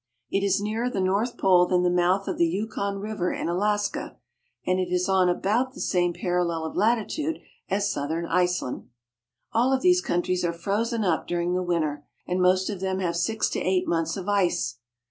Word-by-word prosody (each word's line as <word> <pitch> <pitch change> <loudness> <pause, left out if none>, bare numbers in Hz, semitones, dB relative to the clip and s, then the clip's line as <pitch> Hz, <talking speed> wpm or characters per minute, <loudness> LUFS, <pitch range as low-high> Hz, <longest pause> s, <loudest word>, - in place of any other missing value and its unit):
It 195 - +1
is 195 0 +2
nearer 220 +4 -1
the 205 - -3
North 200 +6 0
Pole 180 -2 +4
than 180 0 +2
the 180 - +3
mouth 180 +2 +2
of - - -3
the 170 - +4
Yukon 200 +2 -2
River 205 -3 -2
in - - -3
Alaska, 205 +4 -1 0.5
and 185 0 +1
it 180 -1 -2
is 180 +1 +1
on 190 -2 +3
about 230 +9 0
the - - -9
same 175 -2 +1
parallel 175 -3 -1
of 160 - -6
latitude 240 +9 0 0.3
as 200 +1 +1
southern 160 +4 -2
Iceland.. 180 -5 -1 0.6
All 245 +4 +3
of 265 +3 +1
these 360 0 +5
countries 180 - -1
are 170 -1 0
frozen 215 +6 -1
up 175 -5 0
during 175 0 -1
the 180 - 0
winter, 155 -5 -1 0.2
and 180 +1 -1
most 185 +1 +3
of 205 -4 -4
them 190 0 -1
have 180 -3 -1
from 170 - -2
six 220 +4 0
to - - -1
eight 185 0 0
months 165 +1 0
of 190 0 -6
ice. 190 - +1
185 Hz, 200 wpm, -25 LUFS, 175-205 Hz, 0.6 s, these